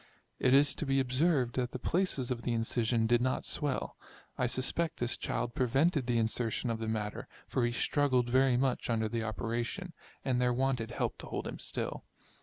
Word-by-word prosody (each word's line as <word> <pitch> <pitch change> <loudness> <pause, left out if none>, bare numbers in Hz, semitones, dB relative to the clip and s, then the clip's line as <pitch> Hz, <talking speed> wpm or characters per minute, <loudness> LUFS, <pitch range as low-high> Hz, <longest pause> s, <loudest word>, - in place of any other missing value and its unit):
It 125 - +3
is 145 +1 +6
to - - -4
be 135 0 +2
observed, 130 -1 +1
that 125 -1 -1
the - - -2
places 140 -4 0
of 120 -2 -2
the 120 - -1
incision 115 0 +1
did 120 +1 +3
not 130 +1 0
swell. 145 -3 -3 0.4
I 125 - +1
suspect 130 +7 0
this 120 0 +1
child 120 - -3
pre 130 - +1
vented 140 +2 +2
the 120 -1 +2
insertion 115 +1 0
of 115 - -3
the 110 - -3
matter, 105 -1 -3 0.2
for 125 - 0
he - - -1
struggled 130 -1 +2
very 130 0 +3
much 130 -1 0
under 110 -1 +1
the 115 +1 -2
operation, 120 - -3 0.3
and 125 -2 +1
there 125 0 +3
wanted 125 -2 0
help - - -2
to - - -8
hold - - -4
him - - -6
still. - - -4
125 Hz, 200 wpm, -32 LUFS, 115-135 Hz, 0.4 s, is